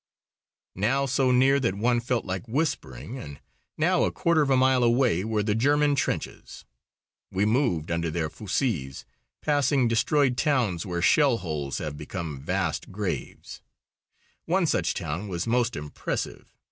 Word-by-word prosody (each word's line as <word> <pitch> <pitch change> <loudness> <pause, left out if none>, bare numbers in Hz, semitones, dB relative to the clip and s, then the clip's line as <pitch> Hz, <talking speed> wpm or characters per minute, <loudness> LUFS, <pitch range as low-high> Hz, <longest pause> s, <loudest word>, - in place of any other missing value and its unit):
Now 120 +9 +1
so 135 -1 +1
near 130 +2 +4
that 115 -8 0
one 120 +4 +2
felt 120 0 -1
like 95 +5 -4
whispering, 130 - -3
and 70 - -9 0.4
now - - +2
a - - +1
quarter 170 -2 +2
of 145 - +1
a 135 - +4
mile 130 -1 +4
away, 120 -6 +3
were 110 -1 -1
the 105 0 +1
German 145 +5 +3
trenches. 130 - -3 0.6
We 95 +2 0
moved 110 - +1
under 85 0 -1
their 80 0 -1
fusées, 90 - -2 0.4
passing 145 -3 +2
destroyed 125 +3 +2
towns 120 - 0
where 85 -1 -2
shell 140 - +4
holes 75 -7 -4
have 75 -1 -5
become 75 -3 -6
vast - - -2
graves. 90 - -5 0.8
One - - +2
such - - 0
town 90 +8 -4
was 85 -3 -3
most 120 0 +1
impressive. 75 0 -5
115 Hz, 145 wpm, -26 LUFS, 85-130 Hz, 0.8 s, near